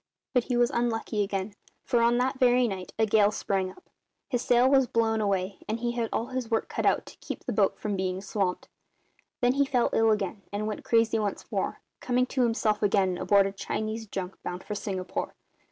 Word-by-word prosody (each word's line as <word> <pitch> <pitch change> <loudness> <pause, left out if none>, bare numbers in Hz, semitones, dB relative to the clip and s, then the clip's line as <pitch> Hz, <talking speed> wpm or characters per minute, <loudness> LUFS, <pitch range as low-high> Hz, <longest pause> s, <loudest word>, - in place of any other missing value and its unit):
"But 250 -2 +2
he 250 -2 0
was 240 0 +3
unlucky 225 -2 -1
again, 195 0 -2 0.3
for 240 -3 +2
on 235 +1 +4
that 260 +2 0
very 250 -1 +4
night 190 -3 -5
a 220 - +3
gale 210 -1 +4
sprang 195 -3 -1
up, 185 - -16 0.4
his 245 -2 -1
sail 245 +1 +4
was 265 -1 +4
blown 225 -1 +1
away, 195 -1 -1
and 220 +2 -1
he 240 0 -1
had 235 -2 -2
all 230 - -1
his 255 -3 -3
work 225 -1 0
cut - - -1
out - - +2
to - - -13
keep - - -6
the - - -3
boat - - +2
from 210 -2 -2
being 185 -1 -1
swamped. 195 -2 -2 0.7
Then 245 0 +4
he 280 +1 +3
fell 260 -3 +1
ill 225 0 +4
again 205 -1 0
and 205 +1 -2
went 215 -1 -4
crazy 230 -1 +3
once 205 -2 -2
more, - - -2 0.2
coming 250 0 +1
to 255 +1 -1
himself 225 -3 +1
again 195 -3 +2
aboard 200 -1 +4
a 195 - -1
Chinese 220 +3 -4
junk 190 -1 -6
bound 180 +1 -5
for 210 - -5
Singapore. 190 -3 -4
220 Hz, 210 wpm, -28 LUFS, 200-240 Hz, 0.7 s, on